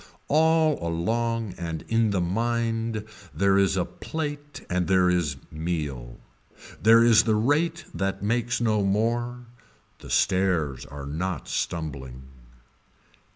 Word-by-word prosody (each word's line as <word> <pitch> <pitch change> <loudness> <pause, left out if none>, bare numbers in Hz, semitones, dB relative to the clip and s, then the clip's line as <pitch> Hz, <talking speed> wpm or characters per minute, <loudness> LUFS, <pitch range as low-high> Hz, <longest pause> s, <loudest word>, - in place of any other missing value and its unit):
All 160 0 +3
along 110 +6 -1
and 85 -2 -4
in 115 -1 +2
the 100 -3 0
mind 115 +3 -1 0.3
there 100 0 +3
is 95 -1 +2
a 90 - +1
plate 145 -2 -6
and 90 0 -1
there 90 -1 +4
is 85 -5 0 0.2
meal. 75 -7 -4 0.6
There 115 +2 +7
is 115 -2 +6
the 110 -2 +2
rate 155 +9 +1
that 95 0 -2
makes 120 +2 0
no 110 -3 +1
more. 120 +5 0 0.5
The - - -12
stairs 85 -8 +1
are 70 0 -8
not 80 +1 -3
stumbling. 65 -6 -4
100 Hz, 120 wpm, -25 LUFS, 85-115 Hz, 0.6 s, There